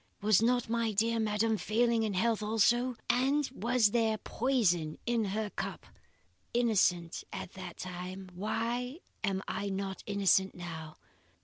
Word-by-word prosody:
Was 210 -1 +4
not 245 +1 +2
my 230 -1 0
dear 230 +3 +2
madam 220 0 +1
failing 230 +4 +2
in 215 -3 -1
health 225 +3 +1
also; 240 +4 +2
and 270 +4 +2
was 235 -2 +2
there 225 -2 +2
poison 200 - +1
in 235 -2 +1
her 205 +1 -2
cup? - - -5 0.7
Innocent 190 -8 +2
at - - -6
that 185 -3 -8
time, 185 +1 -6
why 235 - -2 0.2
am 195 -2 0
I 200 - -2
not 195 0 -3
innocent 195 -1 +2
now? 160 -3 -7
215 Hz, 135 wpm, -31 LUFS, 190-235 Hz, 0.7 s, Was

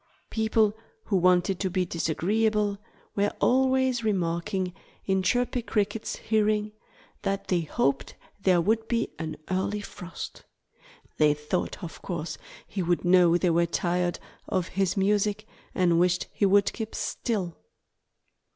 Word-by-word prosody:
People 220 -1 +2 0.3
who 200 - -1
wanted 180 0 +3
to 190 - 0
be 185 0 0
disagreeable 205 +5 0 0.4
were 205 0 +2
always 260 -1 +3
remarking 180 -2 -1 0.3
in 190 -1 +2
Chirpy 245 +5 +1
Cricket's 220 -1 -1
hearing 215 -1 +1 0.5
that 195 0 -2
they 180 -2 +2
hoped 140 -3 -1 0.3
there 185 -3 +4
would 220 +5 +1
be 230 -1 0
an 160 -1 -4
early 195 +3 0
frost. 180 -4 -8 0.7
They 150 -1 +4
thought 150 +6 -3
of 165 - -8
course 170 -3 -4 0.3
he 195 - -4
would 175 0 0
know 175 -1 +6
they 175 -1 +2
were 170 +1 +3
tired 175 +1 0 0.3
of 185 -4 -1
his 190 0 0
music 210 +2 +1 0.3
and 175 -3 +3
wished 180 0 +2
he 200 - +2
would 200 +1 +4
keep 220 -2 -5
still. 195 -8 -2
190 Hz, 135 wpm, -27 LUFS, 175-215 Hz, 0.7 s, know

